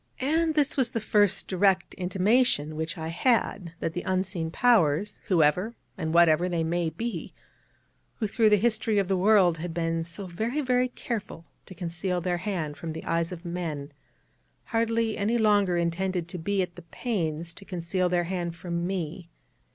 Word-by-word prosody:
And 315 +4 +1
this 295 -2 +1
was 255 -3 +3
the 230 - -2
first 205 -2 +2
direct 190 -1 +2
intimation 185 - +1
which 160 +2 -3
I 160 0 -4
had 190 -3 0
that 165 - -1
the 175 - -3
Unseen 185 -3 -1
Powers 205 -3 +2
(whoever 180 +6 +2 0.2
and 160 - -3
whatever 170 +1 +5
they 170 -2 0
may 170 0 0
be), 230 +9 -5 0.8
who 220 - -2
through 220 +1 +3
the 210 - +6
history 220 0 +1
of 195 -2 +2
the 190 - +1
world 185 -3 +4
had 165 0 -5
been 165 -1 0
so 170 +4 -6
very, 220 - -2
very 255 -2 +2
careful 215 -9 -5 0.2
to 185 - -11
conceal 175 +1 -2
their 175 0 -1
Hand 175 -6 -3
from 165 -2 -5
the 160 - -7
eyes 165 +1 0
of 175 0 -8
men, 160 -5 -4 0.7
hardly 230 -1 0
any 220 +4 +1
longer 205 -5 +3
intended 175 +1 -1
to 180 - -6
be 195 +3 0
at 175 -1 -7
the - - -8
pains 170 -4 -3
to 200 - -12
conceal 180 0 -1
their 175 -1 +2
Hand 175 -1 -3
from 170 0 -3
me. 175 -2 -4
180 Hz, 175 wpm, -27 LUFS, 170-210 Hz, 0.8 s, the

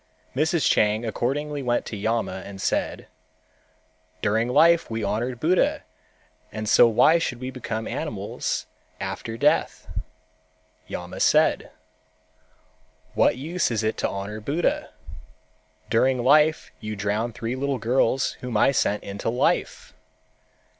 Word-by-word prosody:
Mrs. 160 +2 +2
Chang 105 +2 +2
accordingly 145 +6 -2
went 120 -2 0
to - - -6
Yama 100 -3 -2
and 100 -1 -9
said, - - -1 1.2
"During 110 +3 +1
life 165 +6 +4
we 110 -1 -3
honored 115 +5 -2
Buddha 170 +6 +2 0.7
and 110 0 -5
so 115 - +7
why 155 +9 +5
should 125 -7 -3
we 130 +1 -5
become 110 -3 -4
animals - - -3 0.3
after 115 0 -5
death?" - - +1 1.0
Yama 90 0 -6
said, - - +3 1.4
"What - - +3
use 165 +7 -1
is 115 -2 -1
it 110 0 0
to - - 0
honor 100 +2 -5
Buddha? 150 +10 -1 1.0
During 125 +2 +2
life 150 +4 +4
you 110 -1 -5
drowned 105 +3 -2
three 115 +1 -3 0.2
girls 125 +2 +1
whom 125 -3 -2
I 120 - +4
sent 105 -5 0
into 100 +2 -4
life. 120 +2 -1
115 Hz, 120 wpm, -24 LUFS, 110-135 Hz, 1.4 s, so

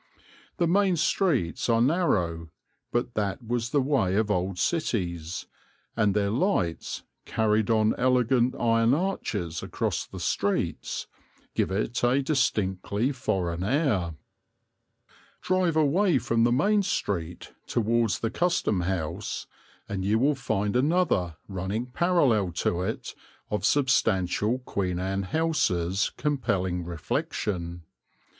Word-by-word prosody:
The 175 - +2
main 190 +2 +3
streets 150 - +1
are 115 -1 +4
narrow, 95 - +1 0.4
but 120 0 -1
that 105 +3 -2
was 120 0 -1
the 140 +1 +2
way 130 -10 +1
of 105 0 +1
old 95 -1 -1
cities, 90 - -1 0.5
and 105 -3 +2
their 100 -1 +1
lights, 110 - -1 0.2
carried 110 -1 +1
on 110 -1 +3
elegant 125 0 +3
iron 115 +2 +3
arches 105 - -2
across - - -2
the - - -9
streets, - - -1 0.5
give - - +1
it 110 +5 -2
a 130 +3 +3
distinctly 105 - 0
foreign 95 -9 -2
air. 105 - +1 1.3
Drive 185 -3 +1
away 160 +3 +3
from 115 -2 +1
the 120 - +3
main 205 - +3
street 90 - -3
towards 115 -1 +1
the 115 - -1
Custom 170 - +1
house, 90 +2 -3 0.4
and 95 -2 -3
you 105 +3 +2
will 140 +6 +3
find 105 -5 -1
another, 130 - +1
running 100 +4 -3
parallel 125 - +2
to 85 +1 0
it, 90 - -4 0.4
of 105 - -1
substantial 115 -5 +2
Queen 95 -8 -2
Anne 95 +2 -1
houses 95 - +1
compelling 100 -12 -1
reflection. 85 +1 -3
110 Hz, 120 wpm, -27 LUFS, 95-135 Hz, 1.3 s, are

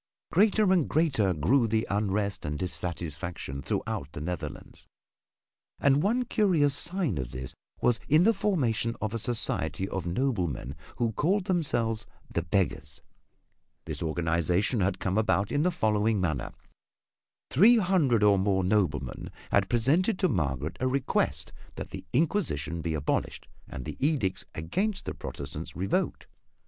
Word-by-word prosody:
Greater 205 +1 +4
and 175 -6 +2
greater 135 - +2
grew 105 - +2
the 110 +1 +1
unrest 100 0 -1
and 75 0 -3
dissatisfaction 85 -5 -4
throughout 70 +1 -3
the - - -6
Netherlands. 90 +3 -6 0.9
And 140 +1 +4
one 235 +7 +1
curious 175 - +2
sign 160 - -1
of 65 -2 -3
this 65 +1 -6 0.3
was 120 -3 +3
in 155 +4 +6
the 225 +4 +5
formation 130 - 0
of 110 0 -3
a 115 - -1
society 110 -4 -1
of 95 -3 -4
noblemen 85 - -1 0.2
who 115 -1 0
called 180 - +1
themselves 120 - 0 0.3
"The 85 - +1
Beggars." 80 -5 -2 0.8
This - - -5
organization 85 - +1
had 100 +1 +1
come 95 +3 0
about 100 -2 +1
in 145 - +1
the 180 - +3
following 110 - +1
manner. 80 -9 -1 1.0
Three 220 - +7
hundred 170 - +3
or 100 -2 +5
more 95 -1 +2
noblemen 90 -10 0 0.2
had 100 -2 +3
presented 155 - +2
to 190 - +2
Margaret 75 - -1
a 130 - +1
request 130 0 0 0.2
that - - -7
the - - -8
Inquisition 105 - 0
be 80 -1 -2
abolished 75 -1 -2 0.2
and 65 - -7
the - - -6
edicts 130 -12 0
against 190 - -2
the - - -3
Protestants 75 +3 -7
revoked. 95 +2 -1
105 Hz, 140 wpm, -28 LUFS, -, 1.0 s, Three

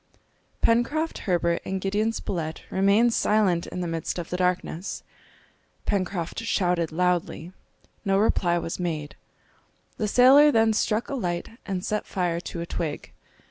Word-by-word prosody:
Pencroft, 290 +8 +1
Herbert, 170 -1 +1
and 190 0 -3
Gideon 205 +4 0
Spilett 165 -7 -4
remained 200 +5 +3
silent 200 -7 +2
in 180 - -5
the 175 - -2
midst 165 0 -3
of 175 -1 -6
the 180 - -1
darkness. 180 0 -2 0.8
Pencroft 185 -4 -2
shouted 180 -7 0
loudly. 180 0 -1 0.5
No 195 -1 +2
reply 180 -4 +2
was 165 0 -4
made. 155 -4 -3 0.8
The 215 - -1
sailor 270 +7 +7
then 225 -3 +3
struck 215 +1 0
a - - -3
light 175 -9 -2 0.2
and 190 -2 -3
set 210 0 -2
fire 175 -3 -1
to 170 -1 -6
a - - -3
twig. 160 -3 -4
185 Hz, 140 wpm, -25 LUFS, 170-215 Hz, 0.8 s, sailor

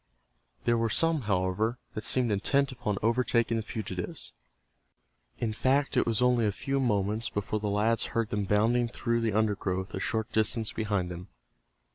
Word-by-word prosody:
There 120 -1 +2
were 115 0 +1
some, 165 +5 +3
however, 100 +5 +1 0.2
that 110 - -5
seemed 125 -3 +2
intent 140 +7 +1
upon 120 -5 -3
overtaking 115 0 +2
the - - 0
fugitives. 100 -5 -5 1.0
In 110 -2 -2
fact 135 +5 +1
it - - +2
was 115 +1 +1
only 125 -3 +3
a - - +1
few 135 +7 -2
moments 110 -2 0
before 105 +1 -2
the 105 0 -2
lads 110 +3 +2
heard 115 0 0
them 105 -2 -1
bounding 115 +4 +2
through 115 0 -1
the 110 -2 0
undergrowth 100 -3 -1
a - - -3
short 110 -1 -2
distance 110 0 +2
behind 100 -5 -1
them. 90 +2 -8
110 Hz, 165 wpm, -29 LUFS, 105-120 Hz, 1.0 s, some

